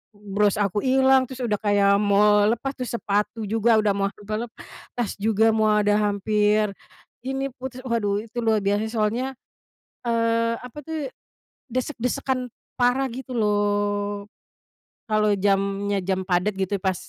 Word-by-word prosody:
mmm, 205 -1 -10
bros 205 -1 +3
aku 205 +2 0
ilang, 265 0 +4
terus 260 -1 -9
udah 215 -3 +1
kayak 200 -1 +3
mau 205 +1 +4
lepas, 270 +4 -3
terus 250 -2 -5
sepatu 210 +1 -1
juga 225 +1 +3
udah 205 -2 +2
mau 200 0 0
sampe 210 +1 -8
lepas 240 -1 -7
juga, 220 +1 +2
mau 215 -1 +3
ada 210 -1 +3
hampir 210 0 +1 0.5
ini, 270 +1 -2
putus. 255 0 -7
Waduh 210 -4 0
itu 240 +2 -5
luar 220 -1 +3
biasa 205 +2 +1
soalnya, 235 +4 -1 0.7
eee, 230 0 +1
apa 250 +4 -9
tuh, 315 -4 -3 0.7
desek-desekan 255 0 -2 0.3
parah 255 +2 +2
gitu 260 +1 -7
loh. 205 -1 0 0.8
Kalau 215 -1 +3
jamnya, 200 0 +1
jam 190 0 0
padet 185 +3 +1
gitu 195 +1 -1
pas, 190 -1 +1
215 Hz, 140 wpm, -24 LUFS, 205-240 Hz, 0.8 s, ilang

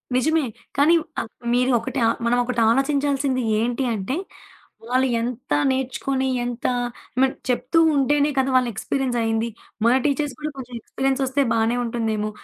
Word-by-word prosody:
నిజమే. 315 +4 +2 0.3
కానీ 300 +4 +5 0.2
ఆహ్, - - -4 0.2
మీరు 250 +1 +3
ఒకటి 230 - -4
ఆ - - +4 0.2
మనం 240 +1 +2
ఒకటాలోచించాల్సింది 270 +3 +1 0.2
ఏంటి 240 +3 0
అంటే, 210 +5 -2 0.7
వాళ్ళు 255 +2 +2
ఎంత 240 -5 -4 0.2
నేర్చుకొని, 265 0 -1 0.2
ఎంత 245 -1 -5 0.6
మన్ 265 0 +4 0.2
చెప్తూ 255 +5 +1 0.2
ఉంటేనే 285 +1 +3
కదా! 265 0 +2
వాళ్ళ 255 -1 +3
ఎక్స్‌పీరియన్స్ 260 +4 -2
అయింది. 225 +1 0 0.4
మన 235 - +5
టీచర్స్ 290 -1 0
కూడా 305 0 -3
కొంచెం 250 -2 -8
ఎక్స్‌పీరియన్సొస్తే 270 +3 0
బానే 230 +1 +1
ఉంటుందేమో! 220 -2 -1
255 Hz, 135 wpm, -23 LUFS, 235-275 Hz, 0.7 s, కానీ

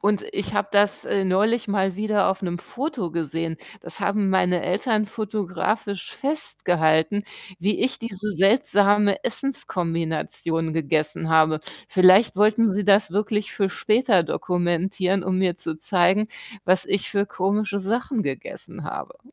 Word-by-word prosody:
Und 205 0 +1
ich 200 - -3
habe 200 - 0
das, 205 0 +2
äh, 195 -1 0
neulich 215 +5 +1
mal 195 -2 0
wieder 210 -2 +1
auf 190 +1 -2
'nem 175 -1 -3
Foto 250 - -4
gesehen. 165 0 -3 0.2
Das - - -6
haben 200 -1 +1
meine 180 -2 +2
Eltern 215 +3 0
fotografisch 205 -1 -3
festgehalten, 175 - 0 0.3
wie 195 +5 0
ich 260 - 0
diese 210 -2 -5
seltsame 205 +1 +3
Essens-Kombination 165 - -2
gegessen 155 0 0
habe. 155 -1 +3 0.3
Vielleicht 185 +3 +5
wollten 215 +1 +3
sie 205 +1 -1
das 200 -3 +4
wirklich 210 +1 -1
für 195 -2 0
später 215 -3 +2
dokumentieren, 180 +3 -1
um 185 0 0
mir 185 -2 +1
zu 165 -2 -5
zeigen, 185 +5 +2 0.4
was 185 +1 +3
ich 200 - -2
für 200 -1 0
komische 200 +1 -1
Sachen 230 +4 -1
gegessen 135 -6 -5
habe. - - -7
195 Hz, 135 wpm, -23 LUFS, 175-210 Hz, 0.4 s, Vielleicht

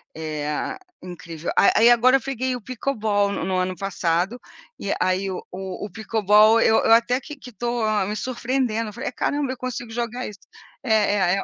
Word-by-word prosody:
Eh, 150 -2 -3 0.2
incrível. 170 -2 -7
A - - +6
a - - +4
aí, 235 +2 +7
agora, 245 +2 +5
eu 270 - +2
peguei 260 -1 -2
o 245 - -7
pickleball 215 -5 -1
no - - -3
no 190 -1 -1
ano 185 0 -1
passado, 190 +3 -1 0.4
e 200 - -2
aí 185 +1 +1
o 185 - -5
o 190 +2 -6
pickleball 215 +2 +4
eu 220 - +4
eu - - +3
até 240 +3 +3
que 295 +2 -9
que 250 - -12
tô 240 +1 -3 0.2
me 210 +2 -3
surpreendendo. 235 -2 -2
Falei: 260 +4 -4
"Caramba, 285 -2 -1
eu 260 - -6
consigo 245 -2 -5
jogar 240 +2 -3
isso". 200 -2 -10 0.4
É, 225 -4 +1
é, 205 -1 +3 0.2
é. - - -3
220 Hz, 190 wpm, -23 LUFS, 190-245 Hz, 0.4 s, aí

